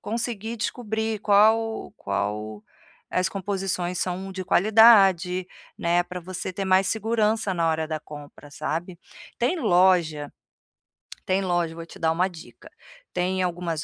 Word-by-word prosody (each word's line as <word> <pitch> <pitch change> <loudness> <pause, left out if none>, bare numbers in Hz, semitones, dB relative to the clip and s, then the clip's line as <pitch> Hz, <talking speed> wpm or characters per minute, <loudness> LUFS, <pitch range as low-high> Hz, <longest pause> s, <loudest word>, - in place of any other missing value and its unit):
conseguir 230 0 -4
descobrir 220 -1 -3
qual 220 +2 +3
qual, 105 +2 -3 0.5
eh, - - 0
as 185 - +1
composições 185 -2 -3
são 190 +1 -3
de 185 -1 -5
qualidade, 195 -4 +5 0.3
né, 175 +1 +2
para 180 0 -7
você 185 +1 -6
ter 195 +2 -4
mais 190 0 +3
segurança 220 -1 0
na 170 -2 0
hora 160 0 0
da 155 -1 -2
compra, 145 -1 -12
sabe. 170 +4 -4 0.4
Tem 325 +9 0
loja 175 - +2 0.9
tem 190 +1 +1
loja 175 -3 -1
vou 165 0 -8
te - - -14
dar 160 0 +2
uma 180 +3 +1
dica, 170 -3 -14 0.4
tem 185 +1 0
algumas 170 -3 -3
185 Hz, 140 wpm, -24 LUFS, 170-210 Hz, 0.9 s, qualidade